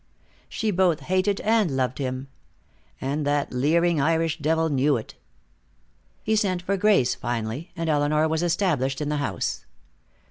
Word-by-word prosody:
She 220 -1 -1
both 180 -4 +2
hated 185 +2 0
him - - -12
and 210 -10 +2
loved 130 0 -1
him. 130 0 -3 0.7
And 140 +3 -2
that 145 -1 0
leering 160 +5 +2
Irish 165 +2 +1
devil 160 +2 +1
knew 140 -1 +2
it. 110 - -8 1.1
He 220 - +1
sent 185 -4 0
for 195 +2 0
Grace, 195 - +3
finally, 120 +7 -4
and 165 -1 -3
Elinor 150 +1 +2
was 160 0 -1
established 160 -7 0
in 150 -1 -2
the 150 - -1
house. 115 -11 -2
155 Hz, 150 wpm, -24 LUFS, 135-180 Hz, 1.1 s, Grace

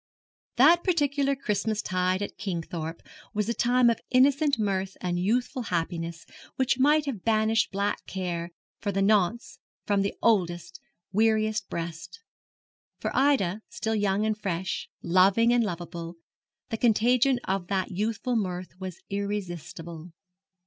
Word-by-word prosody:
That 325 +8 +6
particular 285 -5 +1
Christmas 215 -4 -1
tide 185 +1 0
at - - -6
Kingthorpe 170 -4 -4 0.3
was 210 0 0
a 235 - +1
time 245 +1 +3
of 235 - +2
innocent 275 +2 +4
mirth 195 -3 -1
and 175 -1 -2
youthful 240 +7 0
happiness 170 -4 -3 0.3
which 260 0 +1
might 295 +3 +4
have 245 -10 -4
banished 220 0 +2
black 200 +1 -1
care, 175 -3 -3 0.3
for 205 - -2
the 195 0 +1
nonce, 210 +2 +1 0.3
from 200 -1 +2
the 200 - -1
oldest, 175 -4 +1 0.3
weariest 215 0 +1
breast. 170 - -6 0.8
For - - -3
Ida, 230 -9 +2
still 220 - -2
young 205 -1 +1
and 215 0 +1
fresh, 190 -4 -3
loving 195 +7 +4
and 240 -1 +3
lovable, 170 -3 -5 0.6
the 225 - -1
contagion 245 +3 +3
of 190 -2 -2
that 190 -1 -1
youthful 220 +5 -1
mirth 185 -5 -2
was 185 -2 -7
irresistible. 175 -4 -5
205 Hz, 135 wpm, -27 LUFS, 180-235 Hz, 0.8 s, That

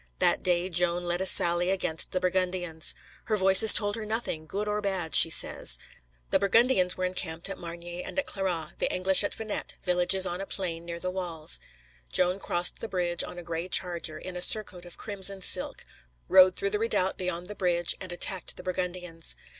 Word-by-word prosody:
That - - 0
day 175 0 -1
Joan 175 0 0
led 175 +1 -3
a 190 - +1
sally 175 0 +3
against 180 -4 +1
the 185 - -2
Burgundians. 180 -3 -1 0.3
Her 215 - -1
Voices 190 +3 +9
told 205 -1 +5
her 225 - -6
nothing, 215 -8 -5
good 205 +5 -5
or 210 0 -3
bad, 190 -6 -4
she - - +8
says. - - +3 0.5
The - - +2
Burgundians 200 -2 +2
were 185 - -2
encamped 175 -1 -5
at 195 - -7
Margny 175 +1 -8
and - - -10
at 280 - -1
Clairoix, 175 -5 -4
the - - -1
English 190 +2 +2
at 205 - -3
Venette, 220 -2 -6
villages 180 +1 +2
on 180 +1 -4
a 195 - -7
plain 170 -3 -5
near 170 0 -6
the 185 +1 -4
walls. 175 -4 +1 0.5
Joan 180 +1 +1
crossed 175 -2 0
the 225 - -6
bridge 175 -2 0
on - - -10
a 175 - -9
gray 170 +1 -6
charger, 175 -3 -1
in 185 -1 -10
a 180 - -6
surcoat 185 -3 +2
of 175 - -14
crimson 195 -2 0
silk, - - +1 0.4
rode 185 0 +5
through 400 0 -3
the 420 - -2
redoubt 310 - -1
beyond 180 -1 -5
the 210 - -6
bridge, 175 -3 -1
and 185 -1 -7
attacked 180 +1 -2
the - - -9
Burgundians. 180 -2 -5
180 Hz, 195 wpm, -26 LUFS, 175-195 Hz, 0.5 s, Voices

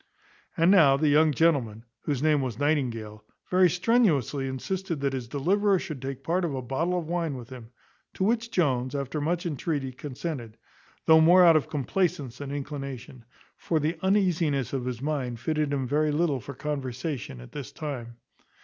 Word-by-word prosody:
And 170 +2 +5
now 150 -9 +6
the 150 +1 +2
young 155 +2 +5
gentleman, 130 -9 +1 0.2
whose 145 -2 -1
name 155 -2 +3
was 125 -5 -3
Nightingale, 120 -8 -1 0.3
very 185 0 +5
strenuously 170 - +2
insisted 170 +6 -3
that 140 -1 -1
his 130 -3 -4
deliverer 190 - +2
should 155 -7 -6
take 135 0 -6
part 180 +5 0
of 155 -5 -1
a 130 - -3
bottle 160 +9 -1
of 170 - -3
wine 165 -3 -2
with 120 -3 -9
him; 120 -3 -10 0.5
to - - -1
which 230 +3 +1
Jones, 130 - 0
after 140 +2 -3
much 170 +4 -1
entreaty, 145 -3 -2
consented, 130 -3 -6 0.5
though 160 0 +7
more 175 +3 +7
out 165 -2 +7
of 155 0 +1
complacence 145 -3 -1
than 145 -1 -6
inclination; 135 -4 -6 0.3
for 160 - 0
the 155 +3 -1
uneasiness 175 - +1
of 130 -2 -2
his 125 0 -4
mind 135 -6 -2
fitted 150 +3 -1
him 135 -2 -1
very 150 +3 +1
little 150 -3 +1
for 140 +3 -9
conversation 130 - -4
at - - -12
this 140 -3 -7
time. 125 -7 -6
145 Hz, 175 wpm, -27 LUFS, 130-165 Hz, 0.5 s, though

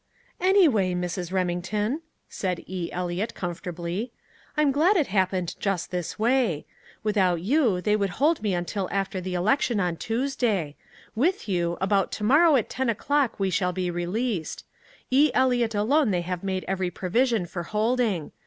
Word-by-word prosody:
"Anyway, 310 - +4
Mrs. 180 0 -3
Remington," 190 - -1 0.3
said 180 -3 -3
E. 180 -2 -4
Eliot 180 +4 -3
comfortably, 175 +4 -4 0.5
"I'm 300 -2 +4
glad 335 +9 +3
it 310 - +3
happened 185 -3 0
just 195 -4 -2
this 180 -2 -3
way. 225 - +1 0.4
Without 190 -5 +2
you, 230 -5 +2
they 210 +2 +2
would 200 -2 0
hold 305 +1 +2
me 205 -4 0
until 180 +2 -3
after 195 -1 -2
the 180 0 -4
election 215 +4 +1
on 175 -3 0
Tuesday. 225 - -1 0.4
With 330 - 0
you, 175 -3 0
about 195 0 +1
tomorrow 295 +9 +4
at 240 - +1
ten 260 -2 -2
o'clock 270 +3 0
we 195 -1 +1
shall 180 0 0
be 180 -1 -2
released. 180 +2 -3 0.5
E. 285 +4 +5
Eliot 245 -3 +2
alone 250 +6 +3
they 180 -3 +1
have 180 +1 -4
made 190 -1 -2
every 190 -1 -1
provision 215 +4 0
for 175 +1 -5
holding. 215 -3 0
195 Hz, 155 wpm, -25 LUFS, 180-245 Hz, 0.5 s, E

